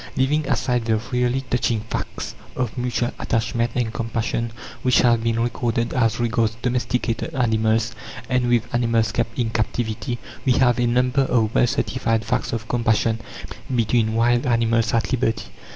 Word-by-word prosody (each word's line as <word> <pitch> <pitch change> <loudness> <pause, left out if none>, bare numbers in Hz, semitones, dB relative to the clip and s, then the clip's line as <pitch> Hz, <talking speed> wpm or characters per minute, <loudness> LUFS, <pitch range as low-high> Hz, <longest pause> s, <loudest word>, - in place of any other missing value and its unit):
Leaving 150 +3 +1
aside 125 -2 0
the 110 -1 +2 0.2
really 125 +1 +1
touching 120 -4 0
facts 110 - -5 0.2
of 125 -3 -2
mutual 125 -1 -1
attachment 115 +1 0
and 115 -3 -1
compassion 115 0 -2 0.3
which 125 -1 +4
have 120 -2 +4
been 115 0 +1
recorded 115 0 -1
as 115 -3 +1
regards 115 -1 +1
domesticated 125 +2 -1
animals 110 -2 +2 0.4
and 125 -1 +1
with 120 -2 +3
animals 115 -2 +2
kept 115 0 -2
in 115 -3 0
captivity, 110 +2 -2 0.3
we 130 - +3
have 125 -1 +3
a 120 - +2
number 125 +3 +2
of 115 -3 +1
well 125 - +4
certified 115 -2 0
facts - - -1
of 115 -1 -4
compassion 115 -1 +1 0.6
between 110 -1 +2
wild 120 +3 +2
animals 115 -1 +2
at 115 -2 0
liberty. 115 -3 -1
115 Hz, 150 wpm, -22 LUFS, 115-125 Hz, 0.6 s, which